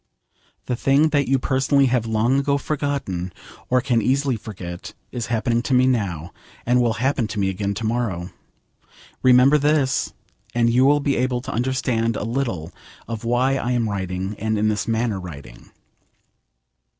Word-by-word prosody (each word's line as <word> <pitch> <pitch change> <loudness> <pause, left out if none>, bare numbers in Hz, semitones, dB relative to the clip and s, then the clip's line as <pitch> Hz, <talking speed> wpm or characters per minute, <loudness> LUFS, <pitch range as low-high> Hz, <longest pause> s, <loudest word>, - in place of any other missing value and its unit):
The 125 - -1
thing 140 +5 +3
that 145 -2 +1
you 135 +1 +3
personally 135 +2 +2
have 125 -3 +1
long 115 +5 +2
ago 140 0 +1
forgotten, 140 - -3 0.4
or 125 0 +3
can 120 -3 +1
easily 135 +3 +1
forget, 90 -5 -8 0.2
is 120 -2 -4
happening 115 0 0
to 130 +1 0
me 125 +1 +5
now, 95 -10 -1 0.3
and 125 +1 +3
will 120 -2 +2
happen 130 -1 0
to 105 - -4
me 95 -1 +1
again 100 +1 -2
to 110 +3 -4
morrow. 110 -7 -2 0.9
Remember 130 +3 +6
this, 145 -2 +1 0.4
and 115 -1 +3
you 125 +2 +4
will 145 +1 +4
be 140 -1 0
able 125 0 0
to - - -6
understand 120 -2 0
a - - -3
little 115 - -2 0.4
of 115 -1 -5
why 125 +3 +2
I 125 -1 -1
am 120 -2 +1
writing, 95 0 -3
and 110 +1 0
in 110 +1 +2
this 105 -1 -2
manner 115 -3 0
writing. 70 -9 -10
120 Hz, 165 wpm, -22 LUFS, 105-130 Hz, 0.9 s, Remember